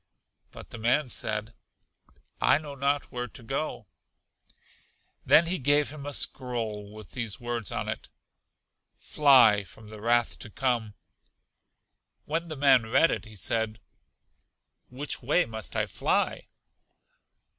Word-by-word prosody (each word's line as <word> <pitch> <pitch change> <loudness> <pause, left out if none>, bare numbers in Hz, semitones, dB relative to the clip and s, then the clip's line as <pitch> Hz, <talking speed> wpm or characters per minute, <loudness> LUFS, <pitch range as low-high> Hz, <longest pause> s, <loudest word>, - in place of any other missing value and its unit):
But - - -12
the 120 - -7
man 125 +5 +2
said, 110 -1 -1 0.9
I - - +5
know 150 -2 -8
not 140 +1 -1
where 125 0 -4
to 115 - -13
go. 135 -1 -4 1.4
Then 165 - +6
he 175 +1 -1
gave 145 +2 +2
him 145 -2 -8
a 145 - -4
scroll 110 -5 -1
with 110 -2 -12
these 115 -6 -3
words 120 -5 -4
on - - -3
it, - - -5 0.9
Fly 130 -8 +5
from 105 +4 -14
the 105 -1 -9
wrath 120 +1 +1
to - - -7
come. 115 -3 -1 1.3
When 165 +3 -2
the 155 -2 -7
man 135 -4 +4
read 150 +7 +4
it - - -3
he 110 0 -11
said, 110 +2 -1 1.1
Which 140 +4 -5
way 150 +8 +2
must 110 -1 -7
I - - +1
fly? - - -1
120 Hz, 135 wpm, -27 LUFS, 110-145 Hz, 1.4 s, Then